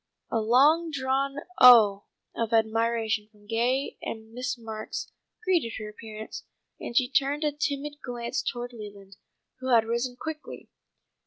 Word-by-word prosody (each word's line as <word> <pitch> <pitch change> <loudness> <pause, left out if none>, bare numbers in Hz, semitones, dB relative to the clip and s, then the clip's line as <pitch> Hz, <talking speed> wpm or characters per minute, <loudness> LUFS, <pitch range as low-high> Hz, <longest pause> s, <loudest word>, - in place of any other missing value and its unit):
A 225 - +1
long 290 +9 +4
drawn 275 -1 -1 0.2
"oh!" 215 -5 +8 0.3
of 230 0 -2
admiration 225 -1 +1
from 210 -1 -23
Gay 240 +5 0
and 220 0 -7
Miss 250 +1 -3
Marks 220 -2 -6 0.3
greeted 345 - +1
her 215 - -6
appearance, 215 0 -9 0.4
and 235 - -4
she 255 - +4
turned 280 +3 +1
a 300 - +2
timid 290 0 -3
glance 240 0 -3
towards 245 0 -4
Leland, 200 -3 -11 0.4
who 260 0 -4
had 230 -2 +5
risen 235 +2 -2
quickly. 315 -1 -7
235 Hz, 140 wpm, -27 LUFS, 220-270 Hz, 0.4 s, oh